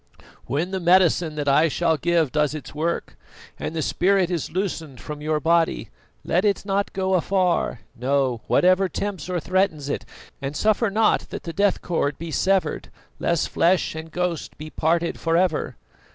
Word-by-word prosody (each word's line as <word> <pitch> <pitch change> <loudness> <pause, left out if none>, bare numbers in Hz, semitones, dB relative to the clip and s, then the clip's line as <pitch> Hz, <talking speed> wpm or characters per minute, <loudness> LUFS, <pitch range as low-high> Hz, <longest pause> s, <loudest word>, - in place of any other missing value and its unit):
"When 165 +7 -1
the 190 - -2
medicine 175 -2 +3
that 145 -1 -3
I 145 +4 +5
shall 165 +1 +1
give 165 -1 +1
does 150 -1 +1
its 155 - -8
work, 165 +3 -2 0.4
and 165 - -4
the 160 - -1
spirit 185 +1 +2
is 170 -4 -2
loosened 165 - -3
from 150 +8 -7
your 155 0 0
body, 165 - +1 0.3
let 180 +3 +1
it 200 -2 +1
not 200 0 0
go 190 0 -1
afar, 180 - +1
no, 130 -1 0
whatever 185 +1 +4
tempts 185 -2 -4
or 180 -1 0
threatens 165 -4 0
it, - - -2 0.4
and 140 +1 -4
suffer 215 +1 +2
not 215 +2 +2
that - - -6
the 165 - -6
death 200 +2 +1
cord 145 -5 -1
be 165 0 -6
severed, 190 +3 0 0.3
lest 170 -2 0
flesh 175 +2 +2
and 160 +1 -7
ghost 180 -1 -3
be 155 0 -8
parted 165 +4 0
for 165 0 +1
ever." 180 -3 0
170 Hz, 170 wpm, -23 LUFS, 155-185 Hz, 0.4 s, I